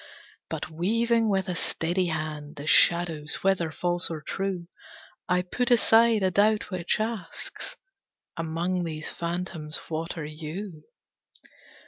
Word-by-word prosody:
But - - -4
weaving 225 +7 +2
with 190 -2 +1
a 180 - -1
steady 175 +2 0
hand 155 -2 -3
The 145 0 -7
shadows, 160 -2 +3
whether 190 -4 +2
false 175 +2 0
or 160 -2 -4
true, 190 +2 -3 0.6
I 180 0 +3
put 245 +7 -1
aside 230 -2 +5
a 185 - +3
doubt 210 +2 +3
which 180 +1 0
asks 215 -5 -4 0.6
"Among 170 +2 -1
these 155 -2 -3
phantoms 170 -2 -3
what 165 +2 -3
are 160 - -3
you?" 155 +2 -7
175 Hz, 125 wpm, -27 LUFS, 160-195 Hz, 0.6 s, aside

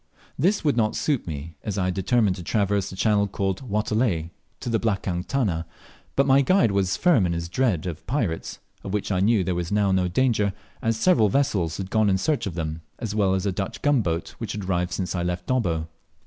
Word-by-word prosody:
This 185 +5 +1
world 145 -5 +2
not 110 -2 +2
suit 145 - 0
me, 80 +1 -6
as 100 -2 -3
I 95 - +1
had 90 - 0
determined 100 +1 +2
to 90 - -7
traverse 100 +1 0
the - - -8
channel 100 0 +2
called 95 -1 -2
Watelai 105 -7 0 0.3
to - - -6
the 115 -2 +1
"blakang 95 -5 -1
tana;" 95 -12 0 0.5
but 140 - +3
my 135 0 +5
guide 160 - +3
was 95 -1 +1
firm 145 - +4
in 85 - -1
his 85 0 -3
dread 95 -3 0
of 90 -1 -6
pirates, 115 - -2 0.3
of 100 +1 -3
which 105 - -2
I 95 - +1
knew 105 0 +3
there 90 - -1
was 85 0 -3
now 100 -1 +2
no 95 -1 +2
danger, 105 0 +1 0.3
as 115 0 0
several 115 - +4
vessels 95 - +1
had 95 -1 -5
gone 110 -2 +3
in 95 - +3
search 145 +4 0
of 90 - -5
them, 80 -1 -3 0.2
as 110 -3 -4
well 100 -3 +2
as 95 +1 -2
a 100 - +1
Dutch 95 +1 -4
gunboat 110 - +1
which 115 -2 -4
had 105 -3 -5
arrived 90 -1 0
since 90 -1 -2
I 90 - -1
left 90 0 -2
Dobbo. 85 -11 0
100 Hz, 220 wpm, -24 LUFS, 90-115 Hz, 0.5 s, my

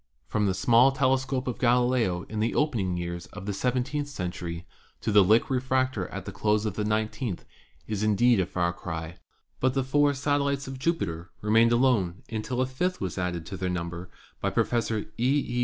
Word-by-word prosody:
From 105 +3 0
the 95 - 0
small 115 +7 +5
telescope 130 -1 0
of 125 - -3
Galileo 120 -7 +2
in 105 +1 -5
the 110 +2 0
opening 110 - 0
years 85 -1 -5
of 105 -1 -10
the 100 - -2
seventeenth 125 +7 -1
century 90 -8 -5 0.4
to - - -1
the 100 -1 +7
Lick 110 +5 +4
refractor 130 -5 0
at - - -7
the - - -5
close 105 0 +1
of 105 - -1
the 105 - -2
nineteenth 110 -1 -2 0.4
is 105 -2 -3
indeed 110 +2 +4
a 90 - +1
far 85 -1 0
cry, 80 0 -6 0.4
but 130 0 +1
the 135 - +2
four 145 +2 +2
satellites 140 0 0
of 135 -1 -6
Jupiter 100 - -2
remained 115 +2 +4
alone 120 -8 +2
until 120 +3 -2
a - - +3
fifth 180 +9 -2
was 95 -1 -3
added 90 -2 -2
to 95 - -6
their 95 -1 -2
number 90 0 -4 0.3
by - - +1
Professor 115 -2 0 0.2
E. 135 +4 +2
E. 120 0 -2
110 Hz, 190 wpm, -27 LUFS, 95-130 Hz, 0.4 s, the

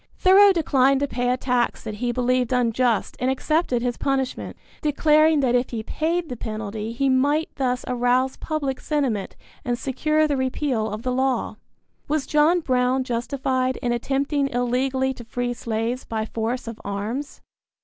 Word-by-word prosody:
Thoreau 390 +2 +7
declined 275 -6 +3
to 285 - +1
pay 245 -1 -1
a 250 - +2
tax 250 -2 0
that 215 -2 -6
he 245 -1 +1
believed 250 0 +1
unjust 245 -2 +1
and 255 - +1
accepted 265 -2 0
his 245 -1 -1
punishment, 270 -2 -2 0.2
declaring 305 0 +4
that 255 -3 +2
if 245 0 +1
he 225 -2 -4
paid 330 +7 -1
the 250 - -5
penalty 215 -1 -5
he 275 +4 0
might 285 +4 +2
thus 250 -2 -1
arouse 250 +1 +1
public 280 -5 -3
sentiment 260 -10 -1 0.3
and 245 -1 -1
secure 305 +4 +1
the 285 -2 0
repeal 260 -3 -1
of 215 +2 -6
the 255 - -1
law. 260 0 0 0.5
Was 300 -1 0
John 310 +4 +3
Brown 255 -2 +1
justified 255 +1 -1
in 240 - +1
attempting 275 +4 0
illegally 260 +2 0
to 245 - -11
free 245 +1 -3
slaves 230 +1 -3
by 220 -1 -3
force 230 +3 -3
of 230 -1 -7
arms? 215 +8 -4
255 Hz, 160 wpm, -23 LUFS, 240-280 Hz, 0.5 s, Thoreau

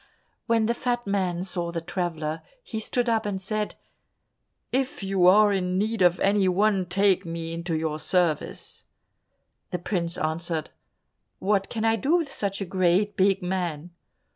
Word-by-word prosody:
When 230 -2 +3
the 235 - +2
fat 240 0 -2
man 185 -3 -1
saw 175 -2 -2
the 170 - -2
traveller, 165 -2 -3 0.2
he 225 - -5
stood 245 +2 -1
up 225 -1 +2
and 205 -3 -2
said, 210 +2 -3 1.0
"If 265 -3 -1
you 190 -2 +3
are 205 +2 +6
in 180 -1 0
need 215 +1 -1
of 175 0 +4
any 195 -1 +3
one, 195 0 +2
take 195 +1 +2
me 165 -1 -5
into 170 -1 -2
your 155 -1 -2
service." 175 -3 -1 0.8
The 180 - -2
prince 175 -1 -2
answered, 160 0 -2 0.7
"What 195 0 0
can 225 -1 -2
I 225 0 +3
do 285 +8 +2
with 325 -5 0
such 200 -5 -2
a - - -1
great 185 +2 +1
big 195 0 +2
man?" 175 -3 -3
190 Hz, 160 wpm, -26 LUFS, 175-210 Hz, 1.0 s, are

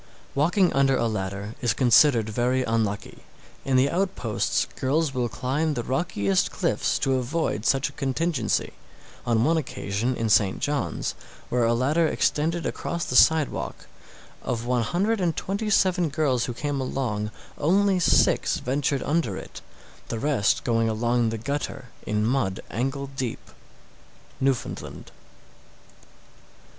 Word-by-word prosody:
666. - - -28
Walking 175 +6 +3
under 135 -1 +3
a 115 - +1
ladder 100 0 -4
is 120 -3 +1
considered 125 -2 +5
very 125 +4 0
unlucky. 110 -3 -2 0.4
In 135 -1 +2
the 135 +2 +3
outposts 175 - 0
girls 140 +2 0
will 125 -2 -1
climb 145 +6 -1
the 120 - -2
rockiest 105 - 0
cliffs - - 0
to 135 -1 +1
avoid 125 -3 -1
such 135 0 +2
a - - -8
contingency. 140 -2 -1 0.5
On 115 -1 +3
one 165 +5 +3
occasion 120 -4 -2
in 115 - -1
St. 100 -2 +3
John's, 145 -1 -2 0.4
where 120 -1 +2
a 115 +1 +2
ladder 150 +7 +2
extended 165 +3 0
across 170 -1 -3
the 125 - -3
sidewalk, 160 +1 +3 0.6
of 120 -2 -3
one 125 -1 +1
hundred 195 - 0
and 170 -3 +1
twenty 200 +3 -2
seven 185 -4 +3
girls 140 -5 +1
who 125 - -4
came 145 +1 -2
along, 115 -5 -2 0.3
only 190 +4 +3
six 175 - +3
ventured 135 +1 -1
under 145 - 0
it, - - -9 0.5
the 115 - -3
rest 125 -5 +1
going 115 -1 +1
along 120 +1 +1
the 115 - -3
gutter 140 +1 -4 0.2
in 105 0 0
mud 115 -6 0
ankle 135 +4 -3
deep. 130 -4 -5 0.9
_Newfoundland. 135 -2 -2
130 Hz, 140 wpm, -25 LUFS, 115-150 Hz, 0.9 s, considered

